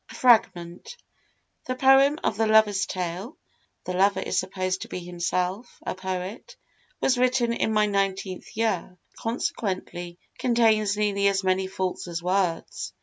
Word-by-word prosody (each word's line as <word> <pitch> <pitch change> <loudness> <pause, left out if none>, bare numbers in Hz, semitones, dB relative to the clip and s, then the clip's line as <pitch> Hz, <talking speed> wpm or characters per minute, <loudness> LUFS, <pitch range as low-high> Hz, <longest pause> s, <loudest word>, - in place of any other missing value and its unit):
] - - -47
A - - -10
FRAGMENT 200 - +2 0.7
The 255 - -1
Poem 270 +3 +5
of - - 0
the 220 +2 +1
Lover's 210 -3 +4
Tale 185 - -4 0.5
(the 185 - -4
lover 195 +2 +3
is - - 0
supposed 185 0 -2
to - - -6
be - - -6
himself 180 +4 -3
a - - -2
poet) 185 +2 -5 0.5
was 255 -2 +2
written 250 -2 +2
in 225 - 0
my 215 -1 +3
nineteenth 195 -1 -2
year, 225 -1 +3
and 180 - -22 0.2
consequently 185 -6 -3 0.2
contains 220 -4 +2
nearly 200 -1 +1
as 195 0 +1
many 190 0 +1
faults 190 -1 -3
as 170 0 -5
words. 180 -2 -1
195 Hz, 150 wpm, -25 LUFS, 185-225 Hz, 0.7 s, Poem